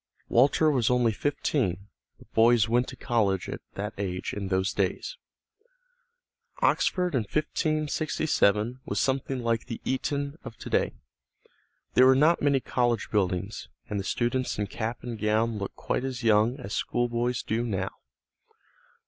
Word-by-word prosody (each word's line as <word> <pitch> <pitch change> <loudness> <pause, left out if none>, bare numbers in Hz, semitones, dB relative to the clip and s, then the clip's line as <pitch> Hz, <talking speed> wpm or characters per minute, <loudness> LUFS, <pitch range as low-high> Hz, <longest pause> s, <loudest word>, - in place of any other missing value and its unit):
Walter 140 +5 +4
was 125 -6 +2
only 125 -2 +3
fifteen, 105 - -1 0.3
but - - -20
boys 115 -1 +5
went 120 +2 +2
to - - -7
college 100 -7 0
at - - -6
that 105 +2 -4
age 90 -2 -3
in 100 -1 -4
those 95 0 0
days. - - -1 1.4
Oxford 180 - +2
in 130 - +3
1567 150 - 0
was - - -2
something 135 -1 -1
like 115 -1 0
the 115 - -5
Eton 140 +3 -2
of 115 -4 -9
to - - -8
day. - - +1 1.0
There 130 - +7
were 130 - +6
not 155 +5 +4
many 140 -2 +3
college 120 -3 0
buildings, 95 0 -1 0.2
and 105 - -1
the - - -3
students 120 +5 -1
in 105 - 0
cap 110 +4 -4
and 120 -3 -5
gown 110 +1 +1
looked 100 - -5
quite - - -2
as 130 -2 -4
young 115 +4 +3
as 100 - -6
schoolboys 120 0 -1
do 115 +2 -1
now. 95 -4 -2
120 Hz, 150 wpm, -27 LUFS, 105-130 Hz, 1.4 s, There